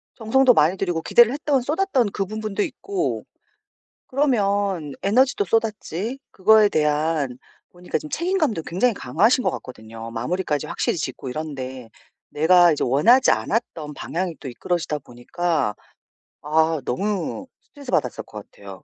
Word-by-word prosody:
정성도 250 +3 +4
많이 175 -1 +3
들이고 175 -4 -1
기대를 235 +6 +5
했던 285 -2 0
쏟았던 290 - +1
그 195 - -1
부분도 215 0 -3
있고 365 +6 -3 0.8
그러면 200 - 0
에너지도 260 - +2
쏟았지 225 - -2
그거에 215 +2 +5
대한 150 -4 0 0.3
보니까 180 0 -4
지금 305 - -10
책임감도 325 - 0
굉장히 205 +9 0
강하신 220 - +2
것 - - +2
같거든요. 115 -2 -9
마무리까지 150 +5 -2
확실히 - - -1
짓고 135 -4 -5
이런데 130 -4 -6 0.4
내가 175 +2 +5
이제 150 - -2
원하지 225 - +4
않았던 160 -10 -2
방향이 175 +3 -4
또 140 - -7
이끌어지다 155 +4 -2
보니까 135 0 -2 0.7
아 160 +1 +1
너무 200 - -2
스트레스 280 -3 -11
받았을 - - 0
것 - - -11
같아요. - - -12
185 Hz, 340 characters per minute, -22 LUFS, 150-240 Hz, 0.8 s, 기대를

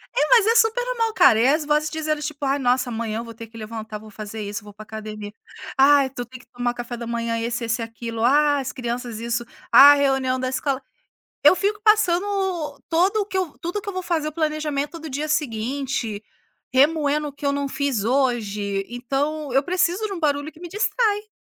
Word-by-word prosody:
É, - - +2
mas 455 -4 +6
é 455 - +4
super 450 +2 +3
normal, 460 -3 -1
cara, 355 - +6
e 235 - +4
as 300 +2 +2
vozes 300 +1 +1
dizendo, 310 -1 -2
tipo: 300 -1 -5
"Ai, 275 +1 +1
nossa, 250 -1 +1
amanhã 225 -1 -3
eu - - -4
vou 230 -1 -9
ter 230 0 -10
que 225 +1 -14
levantar, 220 -1 -6
vou 215 - -13
fazer 215 +1 -7
isso, 205 +1 -5
vou 205 0 -12
pra 210 +2 -11
academia. 215 -1 -7 0.5
Ai, 275 0 +5
tu 245 -2 -6
tem 255 +2 -12
que - - -20
tomar 245 0 -2
café 240 0 -6
da 235 - -6
manhã, 230 0 -2
esse, 235 +1 -2
esse, 230 +1 -1
aquilo. 230 0 -5
Ah, 290 +3 +4
as 260 -2 -4
crianças 240 -2 -4
isso. 235 +1 -2 0.3
Ah, 285 +1 +10
reunião 270 -2 +1
da 255 0 -1
escola". 270 0 -1 0.6
Eu 370 - +8
fico 410 +3 -1
passando 415 -4 +4
o 380 -6 -2
todo 360 +6 +2
o - - -6
que 385 - -5
eu 365 -6 -2
tudo 355 +5 -3
que 415 - -8
eu - - -2
vou 370 0 -4
fazer, 330 -4 -1
o - - -6
planejamento 305 -1 -2
do 320 -1 -8
dia 290 +3 -2
seguinte, 255 -5 -2 0.5
remoendo 295 +2 +2
o - - -9
que 285 - -12
eu 280 - +2
não 280 0 -2
fiz 275 -8 -1
hoje, 210 -6 0
então 275 +4 -2
eu 270 +2 +3
preciso 365 +4 0
de 400 - -6
um 355 - -5
barulho 290 0 0
que 315 - -18
me 350 - -7
distrai. 420 +1 0
275 Hz, 220 wpm, -23 LUFS, 235-315 Hz, 0.6 s, Ah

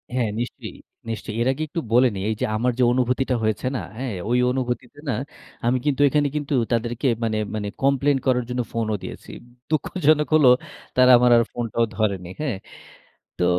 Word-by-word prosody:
হ্যাঁ, 120 -4 +1
নিশ্চয়ই, 120 - -6 0.3
নিশ্চয়ই। 110 -1 -5
এর 120 - +1
আগে 155 +4 -3
একটু 165 +3 -4
বলে 125 +1 +6
নেই। 95 - -4
এই 110 - 0
যে - - +2
আমার 125 +3 +1
যে - - +5
অনুভূতিটা 125 +1 +1
হয়েছে 110 +3 0
না, - - -1 0.2
হ্যাঁ, 125 -6 -3
ঐ - - -1 0.2
অনুভূতিতে 125 +1 -3
না - - +1 0.5
আমি 125 +2 +3
কিন্তু 145 -1 +1
এখানে 145 0 +2
কিন্তু 145 -1 -2 0.2
তাদেরকে 120 +3 0 0.2
মানে 110 -1 0 0.2
মানে 105 -1 -3 0.2
কমপ্লেইন 140 0 +3
করার 125 -1 +2
জন্য 125 0 -1
ফোনও 110 -2 -1
দিয়েছি। - - -8 0.4
দুঃখজনক 155 -1 +2
হলো, 140 -5 +6 0.5
তারা 130 0 +7
আমার 125 0 +4
আর 115 - +4
ফোনটাও 115 -1 -1
ধরেনি। 95 -5 -1
হ্যাঁ? 130 -10 -2 0.8
তো 90 - +2
125 Hz, 175 wpm, -23 LUFS, 115-135 Hz, 0.8 s, তারা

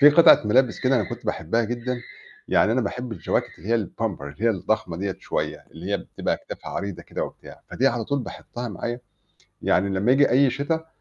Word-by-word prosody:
في 145 +1 +10
قطعة 165 +3 +8
ملابس 125 +1 +3
كده 130 0 +3
أنا 110 - +2
كنت - - -7
باحبها 115 +9 0
جدًا، 120 +2 -3 0.5
يعني 110 - +4
أنا 130 - +2
باحب 125 +3 -3
الجواكت 85 -7 -2
اللي 85 +7 -10
هي 115 -3 +2
الpumper، 100 -6 -3
اللي 70 0 -7
هي 115 - +5
الضخمة 95 -3 -1
دِيّة 95 0 -2
شوية، - - -3
اللي 90 +5 -5
هي 100 - +3
بتبقى - - -2
أكتافها - - -8
عريضة 100 -2 -4
كده - - -3
وبتاع. - - -11
فدي 130 - +1
على 120 -3 +1
طول 140 +4 0
باحُطها 120 -1 -6
معايا، 120 +4 -4 0.6
يعني 95 +2 +3
لمّا 100 +4 +1
ييجي 140 +2 +5
أي 135 +1 +5
شتا 160 +5 -1
115 Hz, 200 wpm, -24 LUFS, 100-130 Hz, 0.6 s, في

